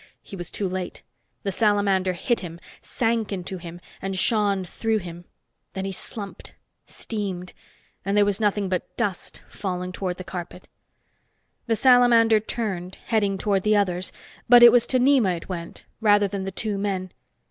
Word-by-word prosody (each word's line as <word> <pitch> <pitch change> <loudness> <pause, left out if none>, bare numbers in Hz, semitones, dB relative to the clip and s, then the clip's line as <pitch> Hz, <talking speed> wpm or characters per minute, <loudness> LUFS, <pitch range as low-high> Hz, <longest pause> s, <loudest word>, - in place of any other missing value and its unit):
He - - -9
was 175 -3 -6
too 200 - -2
late. 185 -1 -5 0.4
The 195 - -1
salamander 200 -2 +2
hit 235 +7 0
him, 170 -2 -8 0.2
sank 225 -3 -1
into 185 -1 -4
him 170 0 -9 0.2
and 195 0 -3
shone 200 -2 +1
through 225 +5 -1
him. 175 -3 -8 0.5
Then 190 0 -4
he 195 - -3
slumped, 200 +1 -8 0.3
steamed... 190 -5 -5 0.5
and 200 +2 +1
was 205 0 +1
nothing 205 -2 +1
but 185 -1 -4
dust 190 -4 -3
falling 180 -2 -4
toward 180 -1 -3
the 185 - -7
carpet. 175 -1 -8 1.0
The 225 - +2
salamander 235 -3 +5
turned, 195 -5 -4
heading 205 -4 +1
toward 195 0 +1
the 215 +2 +2
others. 185 -3 0 0.4
But 240 0 +9
it 240 - +11
was 240 0 +4
to 260 - +2
Nema 250 -9 +3
it 165 - -11
went, 170 -2 -7
rather 205 -2 +4
than 195 -1 -4
the 195 - -3
two 205 +1 -3
men. 190 -2 -2
195 Hz, 160 wpm, -24 LUFS, 185-215 Hz, 1.0 s, it